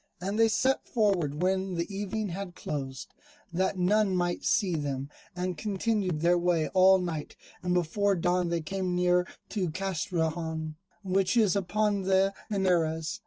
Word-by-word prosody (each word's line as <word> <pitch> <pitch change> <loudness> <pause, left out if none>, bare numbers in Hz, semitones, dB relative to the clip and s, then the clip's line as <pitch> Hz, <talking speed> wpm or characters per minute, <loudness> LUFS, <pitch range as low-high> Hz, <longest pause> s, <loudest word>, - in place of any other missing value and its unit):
And 195 +5 -2
they 225 - +6
set 260 +4 +1
forward 180 - +1
when 190 0 0
the 170 +4 -3
evening 205 +1 -2
had 180 0 -6
closed, 135 -3 -5 0.4
that 190 +2 0
none 195 +2 +2
might 175 -1 -1
see 195 -5 +2
them, 140 -2 -3 0.2
and 180 -2 -3
continued 200 -4 -1
their 175 +1 +4
way 170 -3 +1
all 190 0 +6
night, 170 -5 -4 0.3
and 180 0 0
before 195 +4 +1
dawn 180 0 +1
they 170 -1 0
came 185 +2 -2
near 180 0 +2 0.2
to 190 -5 -1
Castrejon, 160 -3 -2 0.3
which 190 +3 +1
is 210 -5 +4
upon 200 +1 +1
the 190 +1 +2 0.2
Henares. 175 -2 0
180 Hz, 150 wpm, -29 LUFS, 170-195 Hz, 0.4 s, they